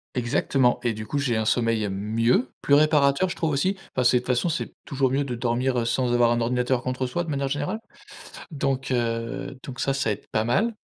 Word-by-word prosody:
Exactement 125 +1 +1
et 120 -2 +1
du 110 0 -7
coup, 145 - -2
j'ai 125 -5 0
un 110 - 0
sommeil 115 -3 +1
mieux, 115 +5 +1
plus 140 - +4
réparateur 150 +2 +3
je - - -4
trouve 160 - -1
aussi, 170 +7 +1 0.2
enfin 130 - +1
c'est 125 +1 +5
de - - 0
toute - - -15
façon 125 +6 +1
c'est 165 -1 -3
toujours 135 -2 0
mieux 140 +2 +1
de 130 -3 -4
dormir 120 0 0
sans 125 0 +1
avoir 120 -1 +4
un 120 0 +1
ordinateur 125 +1 0
contre 130 0 -2
soi 175 +8 -2
de 165 - -7
manière 140 -1 -1
générale. 145 +10 -2 0.7
Donc 135 -3 -2
heu, 120 +2 -2
donc 130 -2 -7
ça 135 - +1
ça 135 -6 0
aide - - -8
pas 110 - 0
mal. 210 - +1
125 Hz, 220 wpm, -25 LUFS, 120-140 Hz, 0.7 s, c'est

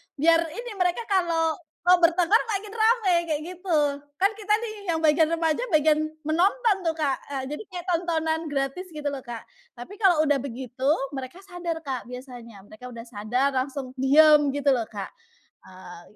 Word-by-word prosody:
biar 330 +3 +4 0.2
ini, 480 0 -6
mereka 360 +5 +1
kalau 335 -3 +1 0.3
mau 360 +1 +7
bertengkar 350 +5 +4
makin 405 +1 -4
ramai 440 -5 +3
kayak 305 -2 -2
gitu, 355 -3 -1 0.4
kan 395 +3 +3
kita 420 0 0
nih 445 -2 -5 0.2
yang 320 - -1
bagian 315 +1 +3
remaja 330 +5 0
bagian 305 0 +4 0.3
menonton 395 +7 +2
tuh 325 -1 0
Kak, 290 -4 0
eee, 270 -2 -3
jadi 300 - -5
kayak 355 0 -6
tontonan 325 -2 0
gratis 280 +6 -3
gitu 300 -2 -5
lho 275 - -5
Kak, 235 -2 -7 0.3
tapi 245 +12 -10
kalau 350 -7 +4
udah 290 -2 +2
begitu, 260 +1 -4 0.3
mereka 265 +7 -7
sadar 355 -3 -5
Kak 260 -4 -5
biasanya, 245 -5 -10
mereka 250 +4 -11
udah 230 -1 -8
sadar, 240 +5 -1
langsung 260 0 -3
diem 295 +1 +6
gitu 285 -1 +2
lho 235 -4 0
Kak. 200 -2 -7 0.5
Eee. 185 -2 -12
310 Hz, 165 wpm, -25 LUFS, 265-355 Hz, 0.5 s, mau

